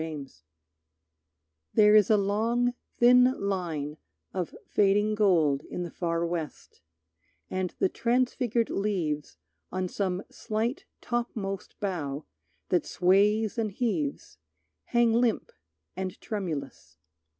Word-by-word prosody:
Barter 155 -3 -5 1.5
There 210 0 +6
is 210 -3 +6
a 215 - +6
long 225 +5 +1 0.2
thin 250 +1 +6
line 165 -7 -2 0.4
of 180 -3 -3
fading 205 +1 +3
gold 170 -10 +3
In 180 - -3
the 175 - -6
far 170 -1 -1
West, 165 - -5 0.7
and 185 -1 -2
the - - +3
transfigured 240 0 0
leaves 165 - -2 0.3
On 185 0 -1
some 185 0 -2
slight, 230 - -2 0.2
topmost 220 -5 -3
bough 155 -8 -3 0.4
that 180 - +1
sways 205 +5 +3
and 215 -2 0
heaves 170 - -2 0.5
Hang 235 -1 +3
limp 235 -1 +1 0.4
and 185 -1 -4
tremulous. 140 - -5
195 Hz, 105 wpm, -28 LUFS, 170-225 Hz, 1.5 s, There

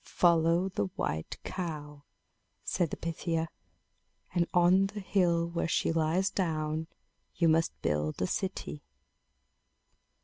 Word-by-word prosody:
"Follow 170 +1 +3
the 100 - -1
white 80 +1 -3
cow," 150 -5 -5 0.6
said 175 -3 0
the - - -5
Pythia; 165 0 -2 0.8
"and 175 -1 +2
on 180 +2 +5
the 205 +1 -7
hill 175 -4 +2
where 170 0 -1
she 165 - +1
lies 165 +4 +1
down, 160 -3 -1 0.5
you 170 - +3
must 165 +1 +2
build 75 +1 0
a 90 - +1
city." 185 - -3
165 Hz, 115 wpm, -30 LUFS, 155-180 Hz, 0.8 s, on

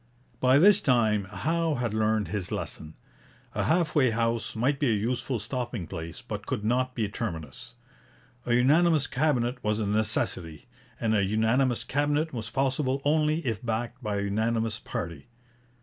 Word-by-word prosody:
By 130 +1 +5
this 195 +6 +6
time 110 -6 +2
Howe 160 - -1
had 120 -3 -2
learned 110 -3 +1
his 100 -2 -3
lesson. 80 0 -5 0.6
A - - -1
half 165 -1 +2
way 135 -4 +4
house 115 0 -1
might 135 +5 +1
be 140 - +2
a 110 - +3
useful 120 +4 -1
stopping 120 -2 -4
place, 80 -1 -7
but - - -6
could 105 - -2
not 125 +2 +1
be 115 - 0
a - - -2
terminus. 85 - -6 0.7
A 120 - +3
unanimous 150 +4 +4
Cabinet 125 -4 0
was 105 0 0
a 110 - 0
necessity, 100 -6 -1 0.3
and 110 -1 +1
a 100 - +3
unanimous 110 +5 +1
Cabinet 145 +2 0
was 115 -2 -5
possible 135 +2 0
only 155 +1 +2
if 115 -1 -2
backed 120 +2 -3
by 105 -3 -2
a - - -1
unanimous 110 +2 0
party. 85 -1 -6
120 Hz, 165 wpm, -27 LUFS, 105-135 Hz, 0.7 s, this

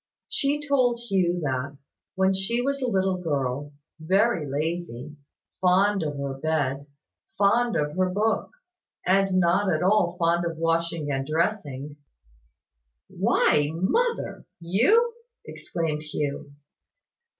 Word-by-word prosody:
She 290 +1 -1
told 250 -4 +2
Hugh 185 -6 0
that, 140 +1 -2 0.4
when 190 0 +3
she 195 +5 -1
was 275 +2 -1
a 255 - 0
little 190 -2 +1
girl, 145 -4 -2 0.3
very 190 0 +1
lazy 150 -2 -4 0.5
fond 195 +2 +3
of 150 -2 -3
her 140 -1 -4
bed 145 -3 -1 0.5
fond 230 +4 +3
of 150 0 -1
her 185 0 +1
book 215 +4 0 0.6
and 190 0 +3
not 185 +3 +2
at 155 +1 0
all 180 -3 +2
fond 170 0 +2
of 170 -1 -3
washing 165 -2 -1
and 135 0 -2
dressing 155 -4 -2 1.1
"Why, 150 -1 +2
mother, 465 - -1
you!" 255 - +3 0.3
exclaimed 160 -3 -3
Hugh. 145 -2 -4
175 Hz, 115 wpm, -25 LUFS, 150-200 Hz, 1.1 s, when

